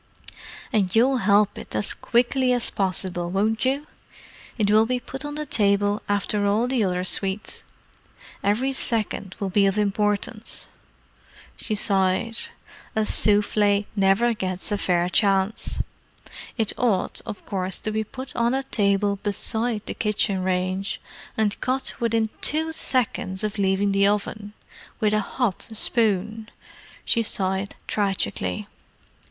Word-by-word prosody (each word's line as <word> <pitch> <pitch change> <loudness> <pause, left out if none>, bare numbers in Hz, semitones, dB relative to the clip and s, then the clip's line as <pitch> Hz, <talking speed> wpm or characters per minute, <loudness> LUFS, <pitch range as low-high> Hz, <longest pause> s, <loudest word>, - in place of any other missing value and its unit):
"And 195 -3 +1
you'll 255 +4 +4
help 205 -1 +3
it - - -9
as 105 - 0
quickly 250 +2 +1
as 245 -1 0
possible, 185 -2 -1
won't 215 +5 0
you? 275 +3 0 0.7
It 210 -3 +2
will 220 +1 +5
be 250 +1 0
put 270 +3 -7
on 290 0 -5
the 300 0 -3
table 205 -5 +2
after 205 0 +1
all 215 +4 +2
the 250 -3 +1
other 180 -2 0
sweets. 195 +2 -1 0.8
Every 240 +7 +1
second 215 -6 -2
will 195 -2 -2
be 200 0 +4
of 195 +1 0
importance!" 210 +2 -1 0.9
She 215 - -2
sighed. 195 +2 +3 0.6
"A 220 0 +2
souffle 205 -1 +2
never 200 +4 +3
gets 185 -2 -4
a 205 - +1
fair 175 -2 +2
chance. 195 +1 +1 0.7
It 220 -3 0
ought, 215 -7 +1
of 205 - -7
course, 190 -2 -3
to 215 - -2
be 220 0 0
put 260 +5 -8
on 235 +2 +2
a 270 - -1
table 200 -4 +1
beside 220 +2 0
the - - -4
kitchen 205 -3 0
range, 185 +1 -1 0.4
and 215 -1 0
cut 260 +1 -1
within 225 -2 +1
two 320 +2 +2
seconds 230 -10 0
of 210 0 -3
leaving 195 +1 +2
the 200 0 +4
oven. 205 0 -2 0.5
With 215 -2 +2
a 215 - +3
hot 210 -1 -1
spoon!" 220 -1 +1 0.6
She 230 - +2
sighed 190 -2 -1
tragically. 205 +1 -1
210 Hz, 135 wpm, -24 LUFS, 195-230 Hz, 0.9 s, will